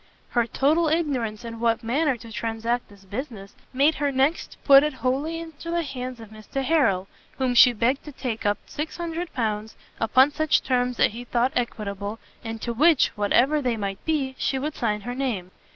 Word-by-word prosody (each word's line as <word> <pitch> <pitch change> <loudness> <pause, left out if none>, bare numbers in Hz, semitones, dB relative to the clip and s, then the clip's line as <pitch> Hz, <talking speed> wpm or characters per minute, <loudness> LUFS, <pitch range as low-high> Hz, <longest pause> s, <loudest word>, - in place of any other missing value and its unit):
Her 240 -2 +1
total 310 +7 +2
ignorance 255 -9 -1
in 230 -1 -7
what 230 0 +1
manner 270 +3 +1
to 230 0 -12
transact 230 +2 -2
this 200 -1 -18
business, 205 -2 -7 0.2
made 280 +4 +3
her 285 -1 +2
next 275 +5 0
put 275 -1 +8
it 300 +1 0
wholly 270 +7 -1
into 330 0 -8
the 340 0 0
hands 255 -3 -6
of 225 -2 -11
Mr 220 +5 -5
Harrel, 255 - +2 0.3
whom 260 -2 +1
she 245 +1 +8
begged 240 +4 0
to 300 - -8
take 245 -4 -4
up 205 -1 +1
600 330 +2 -4
pounds, 220 -2 -2 0.2
upon 255 +6 +4
such 310 +1 +2
terms 250 -1 0
as - - +4
he 235 +3 -7
thought 245 +1 0
equitable, 210 -3 -3 0.3
and 225 -1 -5
to 235 - -2
which, 305 +4 +4
what 205 -1 -3
ever 290 +5 +4
they 245 -4 0
might 195 -2 -4
be, 285 -5 -1
she 270 - 0
would 295 +3 -3
sign 210 -6 -1
her 245 +3 -5
name. 235 -9 -3
250 Hz, 190 wpm, -25 LUFS, 225-285 Hz, 0.3 s, put